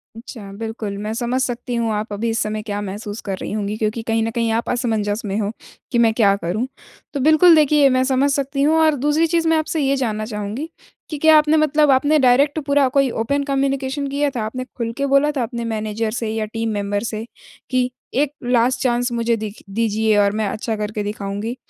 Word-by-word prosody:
अच्छा, 225 -4 -9
बिल्कुल 220 -2 -5
मैं 210 +2 -4
समझ 245 +2 -1
सकती 245 -1 -3
हूँ 230 -1 0
आप 210 0 -3
अभी 225 +3 -2
इस 225 - -1
समय 215 0 -3
क्या 205 -2 -4
महसूस 205 +2 -6
कर 195 -2 -4
रही - - -6
होंगी, 210 0 -2
क्योंकि 220 +1 -1
कहीं 225 0 0
न 225 - -1
कहीं 230 -1 0
आप 230 +1 -1
असमंजस 220 -3 -1
में 200 0 -2
हो 205 0 -1 0.4
कि 245 - +1
मैं 225 -1 +4
क्या 205 -4 +4
करूँ? 200 +6 -2 0.5
तो 285 - -2
बिल्कुल, 315 +4 +6
देखिए 295 -2 +5
मैं 255 0 +2
समझ 270 +2 +2
सकती 275 0 -1
हूँ 310 +3 +3
और 310 -2 +4
दूसरी 295 +5 +1
चीज़ 330 0 +1
मैं 325 0 +4
आपसे 315 0 -1
ये 275 0 +2
जानना 215 -5 -2
चाहूँगी, 215 +7 -5 0.4
कि 305 - -4
क्या 315 +1 +6
आपने 305 +1 +4
मतलब 305 -1 +3
आपने 290 +4 +3
डायरेक्ट 275 +4 +3
पूरा 280 -2 +3
कोई 275 -2 +4
ओपन 280 +6 -1
कम्युनिकेशन 275 0 -1
किया 285 +1 0
था, 240 -5 -4
आपने 255 +3 -5
खुल 230 -1 -2
के 280 - 0
बोला 280 +2 +3
था 250 - +1
अपने 235 0 -4
मैनेज़र 220 0 -2
से 230 -1 -3
या 220 0 -2
टीम 225 0 -2
मेंबर 205 0 -2
से 220 -1 -4 0.4
कि 255 -1 +1 0.2
एक 285 +2 +1
लास्ट 245 +1 +2
चांस 245 -1 +1
मुझे 235 0 +1
दिख 215 0 -7
दीजिए 220 0 +1
और 200 -1 +4
मैं 210 - 0
अच्छा 220 +1 -3
करके 210 0 -3
दिखाऊँगी? 205 +3 -4
235 Hz, 215 wpm, -20 LUFS, 215-275 Hz, 0.5 s, बिल्कुल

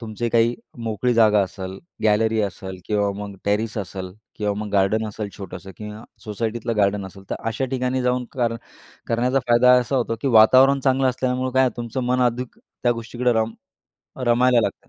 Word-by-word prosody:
तुमची 115 +1 -3
काही 115 +1 +3 0.3
मोकळी 115 +2 0
जागा 105 -2 +5
असेल, 95 0 -6 0.2
गॅलरी 110 +1 +2
असेल 95 -1 -5
किंवा 105 -1 +1
मग 100 -1 -7
टेरेस 105 +3 0
असेल 95 -2 -6 0.2
किंवा 105 -1 -1
मग 105 0 -4
गार्डन 105 +3 +2
असेल 105 0 -5
छोटंसं 95 -1 -8
किंवा 105 +1 -8 0.2
सोसायटीतलं 110 +1 -3
गार्डन 100 -1 +1
असेल, 95 +1 -13
तर - - 0
अशा 115 +4 -2
ठिकाणी 130 0 -1
जाऊन 125 0 0
कर 120 -3 0 0.5
करण्याचा 125 +3 +1
फायदा 120 +1 +6
असा 130 +3 -2
होतो 115 -2 -1
की 140 - +1
वातावरण 130 +5 +6
चांगलं 130 0 +2
असल्यामुळं 130 0 -1
काय 130 - +4
आहे 130 - +3
तुमचं 120 +1 -4
मन 125 +1 +1
अधिक 125 0 -1 0.3
त्या 120 - +4
गोष्टीकडं 120 +2 -2
रम 110 0 0 0.7
रमायला 120 0 +4
लागतं. - - -4
115 Hz, 175 wpm, -22 LUFS, 105-125 Hz, 0.7 s, फायदा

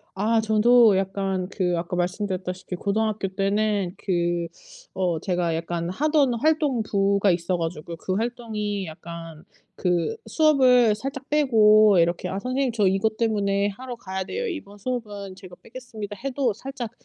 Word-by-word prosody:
아 220 +4 +2
저도 220 0 +5
약간 190 -1 -2
그 180 -3 0
아까 170 +1 -4
말씀드렸다시피 185 0 -3
고등학교 210 +1 -1
때는 200 -1 0
그 175 -2 -1 0.4
어 175 -4 -1
제가 175 -3 -1
약간 170 +1 -3
하던 285 - +2
활동부가 225 - +1
있어 175 +1 0
가지고 165 0 -5
그 185 +3 -3
활동이 215 -3 -3
약간 165 0 -9 0.3
그 180 - 0
수업을 255 -8 +4
살짝 270 +4 -6
빼고 215 -8 +5
이렇게 170 +2 0
"아 190 +2 -3
선생님 255 +2 -1
저 215 -3 +1
이것 210 +3 0
때문에 205 -3 +1
하러 250 +5 -7
가야 190 -3 -5
돼요. 480 - -4
이번 205 - -7
수업은 205 -4 -5
제가 185 -2 -12
빼겠습니다." 225 -4 -8
해도 270 -3 0
살짝 245 +1 -7
205 Hz, 305 characters per minute, -24 LUFS, 185-235 Hz, 0.4 s, 저도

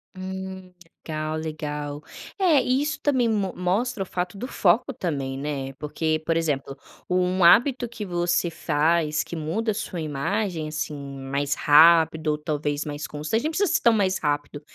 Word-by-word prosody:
Hum 190 0 -7 0.4
legal, 155 0 -2
legal. 150 -2 -5 0.4
É, 330 -8 +4
e 255 +2 +1
isso 305 +1 -2
também 260 -5 +2
mo 200 -4 0
mostra 195 +4 -1
o - - -9
fato 180 +2 -4
do 245 - -4
foco 220 +3 +2
também, 140 -9 -3
né. 140 -2 -4
Porque, 155 +2 -2
por 165 0 +1
exemplo, 145 -4 -1 0.3
um 180 0 +1
hábito 245 +6 +5
que 225 -3 -7
você 175 -1 0
faz 155 0 +1
que - - -11
muda 195 +9 -1
a - - -2
sua 190 -5 -4
imagem 160 +3 -2
assim 155 0 -4 0.3
mais 140 +2 -1
rápido 160 +1 +5
ou 150 0 +2
talvez 150 -1 -2
mais 145 0 -5
constante, 155 - -2
nem 310 - 0
precisa 395 +1 +1
ser - - +2
tão 235 -1 +5
mais 190 -3 +1
rápido, 145 0 -2
170 Hz, 165 wpm, -24 LUFS, 150-200 Hz, 0.4 s, hábito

